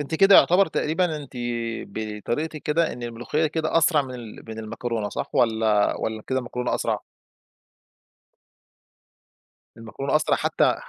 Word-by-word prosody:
أنتِ 145 +2 -4
كده 195 +4 +6
يعتبر 190 +3 +6
تقريبًا، 160 +1 0
أنتِ 145 -3 -9 0.5
بطريقتِك 115 +9 -4
كده 160 +2 +1
إن 125 - -8
الملوخية 120 +7 -1
كده 160 +1 0
أسرع 165 -2 +4
من 130 -2 -8
ال 115 -3 -9
من 110 0 -7
المكرونة، 110 -1 -3
صح - - -5
والّا 110 -3 +2
والّا 110 -1 -3
كده 130 - 0
المكرونة 125 -1 -2
أسرع؟ - - -1 2.8
المكرونة 120 +6 -2
أسرع 155 +1 +2
حتى - - +2
130 Hz, 130 wpm, -24 LUFS, 115-155 Hz, 2.8 s, كده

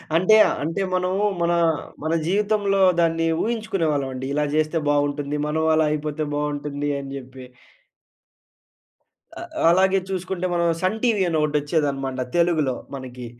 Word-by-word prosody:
అంటే 185 +6 +5 0.3
అంటే 165 +6 -2
మనము 185 +2 0 0.2
మన 170 0 +2 0.5
మన 160 +1 0
జీవితంలో 200 0 +1 0.2
దాన్ని 165 0 +2 0.2
ఊహించుకునేవాళ్ళమండి. 155 - -2
ఇలా 150 +1 +1
జెస్తే 155 +1 +1
బాగుంటుంది. 145 0 0
మనం 160 +1 -1
అలా 155 0 +3
అయిపోతే 150 0 -2
బాగుంటుంది 145 0 -3
అని 135 - -8
జెప్పి. 130 -1 -10 1.9
ఆ! - - -7 0.3
అలాగే 190 +2 +3
చూసుకుంటే 185 -1 -3
మనం 170 0 +1
సన్ 185 +4 0
టీవీ 225 -5 +2
అని 165 -2 0
ఒకటి 150 0 -1
వచ్చేదనమాట. 140 -3 -1 0.2
తెలుగులో 160 -6 +2 0.2
మనకి. 125 -2 -8
155 Hz, 125 wpm, -23 LUFS, 145-185 Hz, 1.9 s, అంటే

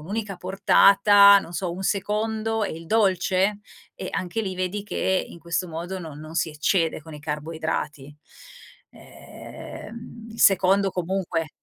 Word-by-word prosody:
un'unica 200 +3 -4
portata, 200 +2 +6
non 175 - -8
so, 175 -1 -3
un 190 +2 -6
secondo 220 +2 -1
e - - -3
il 165 +1 -9
dolce? 195 -1 +1 0.4
E 185 - -6
anche 185 +5 -3
lì 190 -2 -4
vedi 185 +2 -2
che 190 -2 -1
in - - -12
questo 170 +1 -3
modo 175 +4 -5
non 155 -4 -9
non 155 +1 -10
si 165 - 0
eccede 160 +2 0
con 160 0 -12
i 150 - -10
carboidrati, 150 -1 -4 0.8
ehm, 230 0 -11
il 225 - -9
secondo 195 0 +4
comunque 180 -3 -2
185 Hz, 145 wpm, -24 LUFS, 165-200 Hz, 0.8 s, portata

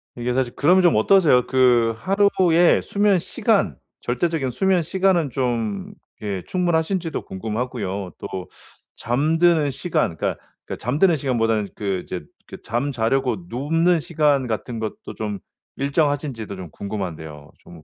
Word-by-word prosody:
이게 120 0 -2
사실 130 -2 0
그러면 180 +6 +4
좀 175 - +5
어떠세요? 145 - +4
그 120 -3 +3
하루에 185 - +3
수면 200 -2 +2
시간, - - 0 0.2
절대적인 135 +1 -1
수면 185 +6 +2
시간은 180 -2 +1
좀 115 -7 -2 0.3
이렇게 100 -4 -4
충분하신지도 175 -1 -1
궁금하고요. 105 -2 -4
또 95 -1 -6 0.5
잠드는 155 +4 +2
시간 135 - -1
그니까 - - -1 0.3
그니까 - - -6
잠드는 155 - +3
시간보다는 115 -6 0
그 95 -3 -2
이제 90 - -5 0.3
그 - - -11
잠 120 +5 -1
자려고 125 0 0
눕는 165 +7 +1
시간 150 -5 +1
같은 115 +1 -4
것도 110 -1 -6
좀 105 -2 -4 0.4
일정하신지도 140 -6 -1
좀 90 -3 -8
궁금한데요. 80 -8 -6
좀 85 -2 -14
130 Hz, 315 characters per minute, -22 LUFS, 110-165 Hz, 0.5 s, 좀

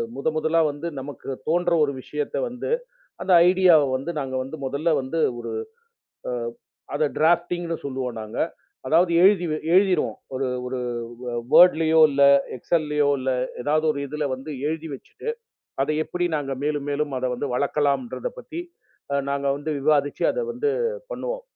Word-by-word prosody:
முத 140 - -3
முதலா 160 +1 +2
வந்து 145 +4 -6
நமக்குத் 135 -1 -7
தோன்ற 175 +2 +2
ஒரு 145 - +1
விஷயத்த 150 +2 -4
வந்து 245 0 -5 0.5
அந்த 190 - +1 0.2
ஐடியாவ 180 -4 +6
வந்து 135 +6 -4
நாங்க 135 -1 -4
வந்து 135 +4 -7
முதல்ல 140 +5 0
வந்து 135 +5 -3 0.2
ஒரு - - -5 1.4
அதை 150 +1 +2
ட்ராப்டிங்னு 170 +1 +1
சொல்வோம். 130 -2 -3
நாங்க 110 +1 -7 0.5
அதாவது 170 +5 +3
எழுதி 190 -2 +5
வ - - 0 0.2
எழுதிரோம். 190 -1 +3 0.2
ஒரு 130 0 -1 0.2
ஒரு 125 +1 -3 0.4
வே 125 -1 -4 0.2
வோர்ட்லயோ 160 -2 +6
இல்ல 140 0 +4 0.3
எக்ஸ்சல்லயோ 150 +1 +1
இல்ல 130 0 -1 0.3
எதாவது 155 +3 +1
ஒரு - - -6
இதுல 150 +2 -3
வந்து 135 +4 -8 0.2
எழுதி 160 +1 -3
வச்சுட்டு, 135 - -10 0.5
அதை 145 - 0
எப்படி 180 +2 -2
நாங்க 140 -2 -3
மேலும் 145 -1 -1
மேலும் 145 0 -1
அதை 130 - -1
வந்து 125 - -3
வளர்க்கலான்றத 145 - 0
பத்தி 335 -8 -6 0.5
அ - - +2
நாங்க 140 0 -1
வந்து 145 +2 -4
விவாதிச்சு 145 0 +1
அதை - - -2
வந்து 440 - 0 0.4
பண்ணுவோம். - - -4
150 Hz, 150 wpm, -24 LUFS, 140-170 Hz, 1.4 s, ஐடியாவ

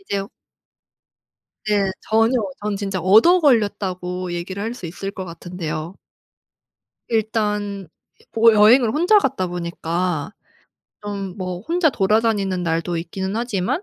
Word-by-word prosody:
이제 200 - -3 1.4
네. 205 -2 +1
전혀 225 +3 +2 0.3
전 210 0 -2
진짜 195 -2 -3
"얻어 220 - +6
걸렸다."고 185 - 0
얘기를 185 +3 -5
할 225 +2 -3
수 190 - -8
있을 185 +4 -5
것 190 -2 -7
같은데요. 170 -1 -6 1.1
일단 210 -4 -1 0.4
보 225 0 +5
여행을 220 +3 +6
혼자 350 - +4
갔다 215 - -1
보니까 175 0 -3 0.7
좀 200 -3 -5
뭐 185 -2 -4
혼자 330 - +1
돌아다니는 200 -3 +1
날도 165 +1 -1
있기는 190 +4 -4
하지만 235 - -1
200 Hz, 245 characters per minute, -21 LUFS, 180-225 Hz, 1.4 s, 얻어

